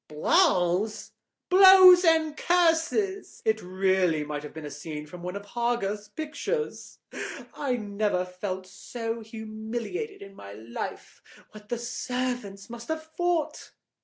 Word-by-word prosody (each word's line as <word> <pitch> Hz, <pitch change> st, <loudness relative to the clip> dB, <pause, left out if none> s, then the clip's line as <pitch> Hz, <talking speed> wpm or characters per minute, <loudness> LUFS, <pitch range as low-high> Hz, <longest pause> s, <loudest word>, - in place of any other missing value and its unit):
"Blows?" 185 Hz, -, +2 dB, 0.4 s
"Blows 375 Hz, -1 st, +9 dB
and 320 Hz, -2 st, +3 dB
curses. 355 Hz, +4 st, +1 dB
It 220 Hz, 0 st, +2 dB
really 185 Hz, -3 st, +1 dB
might 150 Hz, 0 st, -4 dB
have 150 Hz, -, -9 dB
been 160 Hz, -1 st, -8 dB
a 145 Hz, -, -7 dB
scene 150 Hz, 0 st, -7 dB
from 175 Hz, +4 st, -11 dB
one 180 Hz, +2 st, -5 dB
of 200 Hz, 0 st, -6 dB
Hogarth's 210 Hz, -2 st, -2 dB
pictures. 315 Hz, -, -4 dB, 0.6 s
I 265 Hz, -4 st, -1 dB
never 205 Hz, -4 st, -1 dB
felt 185 Hz, +1 st, -5 dB
so 225 Hz, +4 st, -5 dB
humiliated 225 Hz, -, -6 dB
in 195 Hz, 0 st, -12 dB
my 100 Hz, -, -11 dB
life. 110 Hz, +3 st, -7 dB, 0.3 s
What 210 Hz, 0 st, -14 dB
the 240 Hz, -, -1 dB
servants 245 Hz, -4 st, -4 dB
must 235 Hz, 0 st, -9 dB
have 315 Hz, 0 st, -4 dB
thought!" 350 Hz, -3 st, -1 dB
220 Hz, 130 wpm, -27 LUFS, -, 0.6 s, Blows